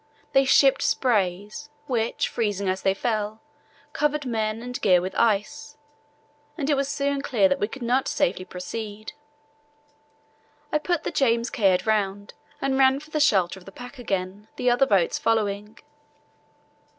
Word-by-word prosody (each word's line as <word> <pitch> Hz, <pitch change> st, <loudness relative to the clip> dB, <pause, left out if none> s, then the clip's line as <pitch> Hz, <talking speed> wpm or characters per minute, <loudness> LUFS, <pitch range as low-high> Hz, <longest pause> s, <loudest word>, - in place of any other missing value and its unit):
They 270 Hz, 0 st, +5 dB
shipped 270 Hz, 0 st, +5 dB
sprays, 210 Hz, +2 st, 0 dB, 0.2 s
which, 235 Hz, -3 st, -1 dB
freezing 205 Hz, -3 st, -2 dB
as 185 Hz, 0 st, -1 dB
they 195 Hz, 0 st, +1 dB
fell, 215 Hz, -1 st, -2 dB, 0.5 s
covered 295 Hz, -1 st, 0 dB
men 220 Hz, -2 st, -2 dB
and 250 Hz, 0 st, -6 dB
gear 180 Hz, -3 st, +5 dB
with 185 Hz, +2 st, -4 dB
ice, 225 Hz, +6 st, 0 dB, 0.8 s
and 285 Hz, -4 st, -2 dB
soon -, -, +4 dB
it -, -, +3 dB
was 280 Hz, 0 st, -1 dB
clear 215 Hz, -8 st, +4 dB
that 185 Hz, -, 0 dB
we 205 Hz, -, 0 dB
could 260 Hz, +3 st, -8 dB
not 250 Hz, +3 st, +1 dB
safely 185 Hz, +1 st, 0 dB
proceed. 210 Hz, +5 st, -7 dB, 1.6 s
I 300 Hz, -, +2 dB
put 345 Hz, +1 st, -1 dB
the -, -, -3 dB
James 235 Hz, -3 st, +1 dB
Caird 190 Hz, -5 st, +2 dB
round 205 Hz, -2 st, -1 dB, 0.3 s
and 270 Hz, 0 st, 0 dB
ran 265 Hz, 0 st, +5 dB
for 300 Hz, +1 st, -15 dB
the 305 Hz, -, -1 dB
shelter 195 Hz, -, +2 dB
of 180 Hz, -, -19 dB
the 195 Hz, -, -11 dB
pack 245 Hz, +5 st, -11 dB
again, 195 Hz, -2 st, -3 dB
the 250 Hz, -, +1 dB
other 245 Hz, +3 st, +3 dB
boats 190 Hz, -5 st, +2 dB
following. 210 Hz, -1 st, -1 dB
220 Hz, 155 wpm, -24 LUFS, 200-265 Hz, 1.6 s, They